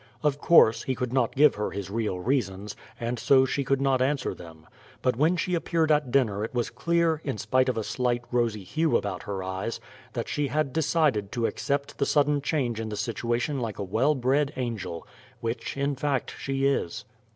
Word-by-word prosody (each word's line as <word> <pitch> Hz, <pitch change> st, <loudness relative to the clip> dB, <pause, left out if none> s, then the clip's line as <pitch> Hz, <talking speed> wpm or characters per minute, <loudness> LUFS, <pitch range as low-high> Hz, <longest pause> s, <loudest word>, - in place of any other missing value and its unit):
Of 145 Hz, -1 st, +1 dB
course, 130 Hz, -9 st, +6 dB
he 130 Hz, -, -2 dB
could 125 Hz, 0 st, -3 dB
not 130 Hz, -3 st, +1 dB
give 145 Hz, -2 st, +6 dB
her 105 Hz, -, -2 dB
his 100 Hz, -1 st, -6 dB
real 105 Hz, -4 st, -1 dB
reasons, 100 Hz, -4 st, -1 dB, 0.2 s
and 120 Hz, 0 st, -2 dB
so 130 Hz, +2 st, +5 dB
she 140 Hz, +2 st, -1 dB
could 135 Hz, +1 st, +1 dB
not 135 Hz, -2 st, +2 dB
answer 140 Hz, +1 st, 0 dB
them. 80 Hz, -2 st, -13 dB, 0.4 s
But 125 Hz, -, +2 dB
when 160 Hz, +8 st, +2 dB
she 180 Hz, +1 st, -1 dB
appeared 165 Hz, -2 st, +1 dB
at 150 Hz, -3 st, +2 dB
dinner 110 Hz, -6 st, +2 dB
it 115 Hz, -, -5 dB
was 120 Hz, -1 st, -1 dB
clear, 165 Hz, +4 st, +1 dB
in 135 Hz, -6 st, -3 dB
spite 130 Hz, +6 st, +2 dB
of 125 Hz, -, -1 dB
a 110 Hz, -, -1 dB
slight 120 Hz, +1 st, -1 dB
rosy 115 Hz, -4 st, 0 dB
hue 155 Hz, -, +1 dB
about 95 Hz, -4 st, -4 dB
her 95 Hz, -2 st, -4 dB
eyes, 95 Hz, +5 st, -3 dB, 0.3 s
that 120 Hz, -2 st, -3 dB
she 145 Hz, -1 st, -1 dB
had 150 Hz, -2 st, -1 dB
decided 150 Hz, -10 st, +1 dB
to 120 Hz, -1 st, 0 dB
accept 140 Hz, +2 st, -2 dB
the 140 Hz, -, +2 dB
sudden 145 Hz, -1 st, +2 dB
change 130 Hz, -6 st, -1 dB
in 110 Hz, -1 st, -3 dB
the 105 Hz, -, -5 dB
situation 120 Hz, +5 st, -1 dB
like 115 Hz, -4 st, -4 dB
a 100 Hz, -, -3 dB
well 115 Hz, +10 st, +2 dB
bred 135 Hz, +3 st, +1 dB
angel 115 Hz, -9 st, -4 dB, 0.3 s
which, 115 Hz, +3 st, -4 dB
in 140 Hz, 0 st, 0 dB
fact, 135 Hz, -1 st, -1 dB
she 135 Hz, 0 st, -2 dB
is. 135 Hz, -11 st, 0 dB
130 Hz, 200 wpm, -27 LUFS, 110-140 Hz, 0.4 s, course